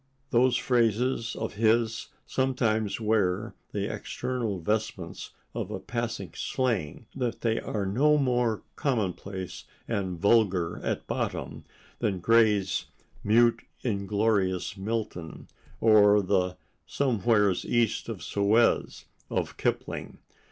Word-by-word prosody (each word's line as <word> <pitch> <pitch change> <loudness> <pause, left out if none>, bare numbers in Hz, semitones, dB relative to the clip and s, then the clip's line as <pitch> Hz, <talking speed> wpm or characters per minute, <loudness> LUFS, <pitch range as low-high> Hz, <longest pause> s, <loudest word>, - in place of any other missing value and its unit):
Those 125 0 +4
phrases 120 0 +1
of - - -4
his 115 +1 +1 0.2
sometimes 115 -6 0
wear 105 -1 +1 0.2
the 100 -1 -2
external 120 -6 -3
vestments 105 -2 -3 0.2
of - - -4
a - - -4
passing 115 -7 -4
slang, 115 - -2
but 125 -3 -2
they 115 -1 +1
are 105 -2 -3
no 145 +10 +3
more 125 -5 +1
commonplace 100 -7 -3 0.2
and 95 -6 -2
vulgar 100 -5 +2
at - - -2
bottom - - -3 0.3
than 95 -3 0
Gray's 105 -1 +3 0.4
"mute, 115 +3 +4 0.2
inglorious 100 -4 0
Milton" 100 -5 -4 0.3
or 105 -2 +6
the 90 -1 +1 0.3
"somewheres 110 -7 +2
East 120 -2 0
of - - -5
Suez" 105 +4 +2 0.2
of - - -2
Kipling. - - -3
110 Hz, 105 wpm, -28 LUFS, 100-120 Hz, 0.4 s, or